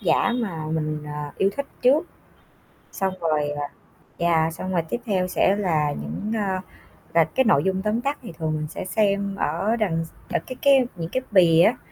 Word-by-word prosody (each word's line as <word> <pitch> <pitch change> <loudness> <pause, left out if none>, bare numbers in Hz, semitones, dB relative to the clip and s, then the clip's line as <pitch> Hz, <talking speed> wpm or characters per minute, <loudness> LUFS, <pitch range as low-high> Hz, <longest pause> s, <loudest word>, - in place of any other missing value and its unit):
giả 240 - +2
mà 180 -11 -3
mình, 155 -1 -2
ờ, 150 0 -5
yêu 195 - +3
thích 280 - -2 0.2
trước, 285 +7 +4 0.9
xong 190 -1 -1
rồi, 155 -3 +1
ờ 145 0 -3 0.6
yeah, 165 -1 +2
xong 185 +3 -5
rồi 175 -2 +2
tiếp 240 - -2
theo 185 -4 +1
sẽ 190 +2 +2
là 160 -7 +1
những, 75 - -5
a, 195 -3 -1 0.5
là 165 - +6
cái 260 - +1
nội 145 -9 +4
dung 190 0 0
tóm 215 +3 0
tắt 280 +2 -1
thì 230 - -8
thường 160 -2 -1
mình 155 0 -3
sẽ - - -6
xem 200 -1 +1
ở 195 +8 0
đằng 170 -8 0
s - - -15 0.2
ở - - +3
cái 255 - -6
cái 275 -3 +5
những 165 -1 -5
cái 255 - 0
bìa 170 -4 +6
á. 230 - +4
185 Hz, 200 wpm, -24 LUFS, 160-215 Hz, 0.9 s, là